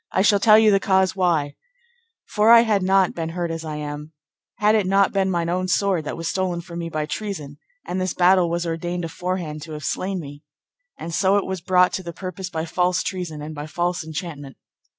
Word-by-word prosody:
I 190 - +2
shall 205 -1 +4
tell 215 +1 +7
you 220 -1 +5
the 195 - +4
cause 190 -1 +2
why: 165 -6 +1 0.7
for 210 +1 +2
I 230 0 +9
had 215 -4 +1
not 190 0 +3
been 165 -1 -4
hurt 170 0 -3
as 165 0 -5
I 155 -1 -5
am, 150 +1 -6 0.4
had 210 +1 +3
it 210 -4 +2
not 195 0 +3
been 195 -1 +1
mine 170 -2 -1
own 185 +2 -1
sword, 185 -4 +1
that - - -4
was 165 0 -4
stolen 185 -2 -1
from 170 0 -8
me 165 -1 -4
by 155 -2 -2
treason; 155 -6 -6 0.3
and 185 +1 -3
this 185 - -2
battle 180 -1 +4
was 170 +1 -2
ordained 175 +1 -3
aforehand 170 -3 -4
to 155 +1 -8
have 150 -2 -7
slain 190 0 -2
me, 145 -2 -9 0.6
and 170 - -7
so 190 +3 +3
it 200 - 0
was 190 -2 -4
brought 180 0 +3
to - - -2
the 170 -2 -7
purpose 185 +1 -6
by 160 -2 -3
false 180 +2 0
treason, 170 -6 -5
and 155 +1 -6
by 150 0 -6
false 175 +2 -2
enchantment. 155 -4 -7
175 Hz, 220 wpm, -22 LUFS, 160-190 Hz, 0.7 s, I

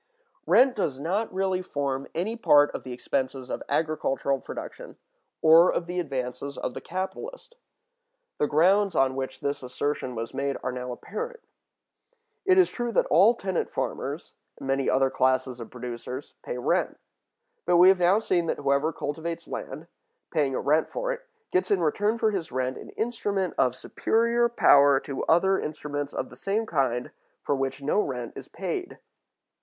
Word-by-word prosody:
Rent 255 +2 +5
does 145 - -1
not 195 +9 -1
really 190 -1 0
form 140 -5 -3
any 195 +8 -1
part 145 -10 +5
of - - -5
the 130 - -8
expenses 130 +1 -3
of - - -3
[agricultural] 140 -3 0
production, - - -8 0.5
or 165 +3 +7
of 170 - -2
the 180 +1 -3
advances 140 -2 -4
of - - -3
the - - -6
capitalist. 445 - -6 0.9
The 150 - +2
grounds 190 +6 +3
on 130 -1 +3
which 130 0 -5
this 140 0 -2
assertion 130 0 -3
was 115 0 -5
made 140 0 -1
are - - -1
now 125 0 -5
apparent. 470 - -6 1.0
It 375 -1 +5
is 370 - +5
true 240 -1 -3
that - - +3
all 195 +10 +6
tenant 190 -5 -2
farmers, - - -4 0.2
and - - -8
many 135 0 +1
other 135 0 +3
classes 130 -1 +1
of 115 - -8
producers, 125 +2 -7
pay - - -5
rent. - - 0 0.7
But 175 - +5
we 180 +2 +8
have 190 -1 +4
now 180 +3 +4
seen 180 -6 0
that - - -1
whoever 140 +2 +1
cultivates 165 +3 -5
land, 150 +5 -6 0.5
paying 145 -5 +1
a - - -1
rent 155 +2 +2
for - - -2
it, - - -6 0.2
gets 185 0 +1
in 200 - +3
return 205 +7 +1
for 220 -1 +2
his 180 -7 -3
rent 130 +1 -1
an - - -10
instrument 205 -5 -1
of 125 -1 +2
superior 235 - +1
power 140 -11 +6
to 140 - -5
other 190 +4 +3
instruments 145 -1 -4
of 130 - -4
the - - -11
same 200 - -1
kind 130 - -1 0.3
for - - 0
which 135 0 -2
no 150 +8 +2
rent 125 - -4
is - - -9
paid. - - -5
155 Hz, 170 wpm, -26 LUFS, 135-195 Hz, 1.0 s, we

